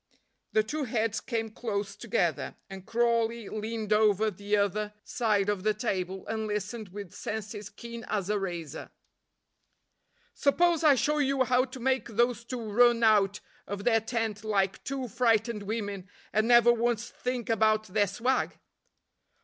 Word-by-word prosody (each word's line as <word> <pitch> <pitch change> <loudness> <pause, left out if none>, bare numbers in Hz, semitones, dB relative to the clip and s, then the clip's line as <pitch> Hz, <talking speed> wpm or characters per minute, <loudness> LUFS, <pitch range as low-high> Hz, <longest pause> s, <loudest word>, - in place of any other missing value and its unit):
The 215 - +4
two 295 +6 -3
heads 220 -2 -1
came 225 -3 -3
close 205 -3 -3
together, - - -1 0.2
and 190 -1 -9
Crawley 235 -1 +1
leaned 215 0 -2
over 215 0 +3
the 205 +2 -1
other 205 +1 0
side 210 -4 +1
of 205 -2 0
the 215 +1 +1
table 190 -4 -3
and 220 -1 -3
listened 210 +1 -4
with 200 -1 -8
senses 210 -1 -5
keen 235 +2 -9
as 200 -3 -2
a 210 0 +1
razor. 170 -5 -5 1.4
"Suppose 335 +3 +2
I 295 -3 +7
show 295 +5 +1
you 275 -2 +2
how 255 0 +3
to 260 0 -10
make 260 -1 0
those 240 +1 +1
two 240 0 -5
run 240 +1 +5
out 205 -2 +4 0.3
of 200 0 -5
their 225 -1 +3
tent 225 -2 -2
like 200 -3 0
two 270 -2 -3
frightened 230 -1 +1
women, 200 -3 -4 0.2
and 215 +1 +2
never 240 0 +7
once 235 -1 0
think 250 -2 -3
about 215 -1 +3
their 205 0 +1
swag?" 235 +7 0
220 Hz, 150 wpm, -29 LUFS, 205-240 Hz, 1.4 s, I